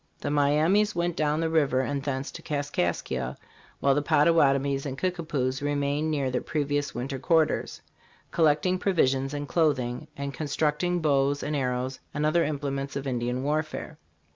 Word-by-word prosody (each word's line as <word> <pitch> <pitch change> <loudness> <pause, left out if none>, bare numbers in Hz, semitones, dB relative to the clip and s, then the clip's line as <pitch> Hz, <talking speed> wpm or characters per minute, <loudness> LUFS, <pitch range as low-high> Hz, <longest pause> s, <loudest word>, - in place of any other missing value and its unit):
The - - -3
Miamis 155 +9 +3
went 170 0 0
down 155 0 +1
the 165 - 0
river 140 -5 +3
and 140 +2 -2
thence 135 -1 -3
to - - -9
Kaskaskia, 145 - -2 0.4
while 140 - +4
the 145 - +1
Pottawatomies 140 -3 +3
and 135 -2 -5
Kicka 180 +1 -1
poos 130 -4 -1
remained 145 +1 0
near 140 -4 0
their 125 - -1
previous 145 -2 -1
winter 130 +3 -3
quarters, 160 +3 +1 0.5
collecting 165 +3 +2
provisions 135 -8 +1
and 145 0 -4
clothing, 145 -4 0
and 140 0 -4
constructing 155 +4 0
bows 140 -2 +2
and 150 - -2
arrows 130 -1 -2 0.2
and 150 +1 0
other 165 +2 +3
implements 140 -2 -3
of 140 0 -3
Indian 125 0 -1
warfare. 155 +1 -2
145 Hz, 155 wpm, -27 LUFS, 135-155 Hz, 0.5 s, while